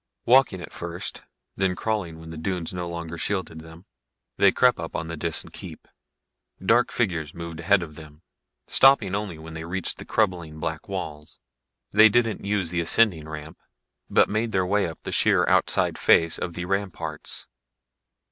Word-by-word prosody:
Walking 125 -7 +4
at - - -9
first, - - -5 0.3
then 95 -1 0
crawling 100 -8 -2
when 80 0 -10
the - - -7
dunes 85 +1 -3
no 90 -1 -4
longer 85 -1 -6
shielded 95 -5 -2
them, 80 +3 -14 0.5
they 100 - +5
crept 125 -1 +3
up 80 - -6
on 80 - -2
the 85 - -4
Disan 80 +1 -3
keep. - - -10 0.7
Dark 115 +6 +3
figures 85 -10 -1
moved 85 -1 -7
ahead 95 +2 +3
of 80 -3 -9
them, 75 +1 -13 0.4
stopping 135 -8 +5
only 100 -5 -3
when 80 +1 -10
they 80 0 -6
reached 90 +2 -2
the - - -8
crumbling 85 -7 -1
black 80 0 -4
walls. 75 -6 -6 0.5
They 110 +2 +7
didn't 115 0 +1
use 100 -4 0
the 85 -1 0
ascending 85 -3 +2
ramp, 80 0 -8 0.5
but - - +4
made 110 +2 -1
their 95 -1 +2
way 100 +1 +1
up 80 - -9
the - - -5
sheer - - +3
outside - - +2
face 80 -1 +4
of 85 - -4
the 90 +1 -4
ramparts. 100 0 -3
90 Hz, 170 wpm, -25 LUFS, 80-100 Hz, 0.7 s, They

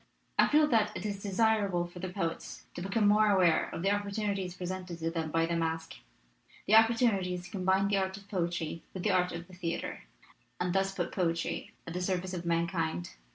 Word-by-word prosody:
I - - +7
feel 305 +1 +5
that 220 -4 +3
it - - -6
is 200 -1 -3
desirable 200 -3 +2
for 175 +1 -10
the 185 +1 -4
poets 170 -3 -4
to - - -6
become 205 +2 +3
aware 200 -5 +4
of 165 - -5
the 195 - +3
opportunities 200 -2 -1
pre 180 - -5
sented 180 -1 -5
to 165 0 -2
them 165 -2 -2
by 165 +1 +2
the 170 +1 -1
masque, 165 0 -2 0.7
the 210 - +1
opportunities 220 -6 +4
to 185 - -12
combine 190 0 +2
the 200 0 +2
art 190 0 -1
of 200 0 -14
poetry 170 -4 -2
with 185 - -4
the 215 - +2
art 180 -1 +2
of 170 0 -6
the 185 - -16
theater, 175 -2 -4 0.5
and 180 0 0
thus 195 0 +2
put 175 -3 -2
poetry 170 -3 -1
at 170 - -6
the 180 - -2
service 185 0 -1
of 175 -1 -4
mankind. 165 - 0
185 Hz, 200 wpm, -31 LUFS, 170-200 Hz, 0.7 s, I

